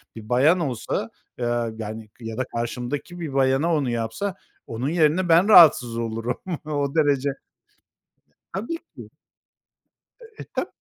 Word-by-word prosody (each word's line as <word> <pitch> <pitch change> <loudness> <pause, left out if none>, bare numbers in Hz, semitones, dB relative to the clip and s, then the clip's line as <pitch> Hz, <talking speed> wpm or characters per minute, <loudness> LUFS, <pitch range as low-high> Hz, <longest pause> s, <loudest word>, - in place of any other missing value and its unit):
bir 110 0 -10
bayan 145 +9 +4
olsa, 130 -8 -2 0.3
ııı, 120 -2 -1
yani 110 0 -7
ya 115 -1 -7
da 130 - 0
karşımdaki 125 +8 -4
bir 160 -5 -5
bayana 135 +5 +2
onu 140 -5 0
yapsa, 120 - -3 0.3
onun 120 +5 -3
yerine 170 +2 +2
ben 170 +4 +5
rahatsız 140 - +7
olurum. 115 +1 -3 0.3
O 145 -1 -2
derece. 145 -3 +2 1.2
Tabii 230 - -3 0.2
ki. - - -11 1.1
Eee, 450 -1 -12
tab - - -2
135 Hz, 130 wpm, -23 LUFS, 115-165 Hz, 1.2 s, rahatsız